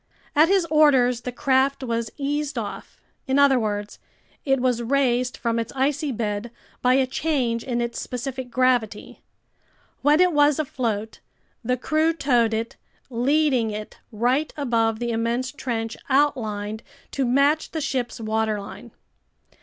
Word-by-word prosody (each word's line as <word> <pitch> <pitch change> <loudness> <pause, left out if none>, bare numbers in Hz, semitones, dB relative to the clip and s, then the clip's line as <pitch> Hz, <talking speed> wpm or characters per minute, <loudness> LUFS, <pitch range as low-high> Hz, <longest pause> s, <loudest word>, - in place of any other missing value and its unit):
At 305 +3 +6
his 385 -3 +3
orders 260 -6 +4
the 250 - -4
craft 270 0 +1
was 230 -2 -2
eased 290 0 -2
off, 210 -3 -6 0.3
in 265 +1 +1
other 280 -2 +5
words, 210 -2 -3 0.5
it 270 -2 +2
was 250 -2 +1
raised 250 0 +1
from 230 -2 -1
its 230 - -4
icy 285 +2 0
bed 215 -1 -3 0.3
by 250 +1 +4
a 265 0 +3
change 255 -4 -1
in 240 -2 -2
its 235 0 -3
specific 255 0 -5
gravity. 245 -4 0 0.8
When 295 +3 +4
it 360 -1 +4
was 290 -1 +4
afloat, 230 -7 -3 0.4
the 250 +2 0
crew 310 +5 +1
towed 245 -7 +2
it, 225 +1 -4 0.3
leading 260 -1 +2
it 210 0 -7
right 250 +7 0
above 230 -5 +1
the 240 +1 -2
immense 235 +3 -1
trench 230 -5 -4
outlined 220 -7 0 0.3
to 275 - -1
match 280 +5 +2
the 320 - -4
ship's 255 -5 -2
waterline. 215 -2 -3
250 Hz, 140 wpm, -23 LUFS, 230-280 Hz, 0.8 s, At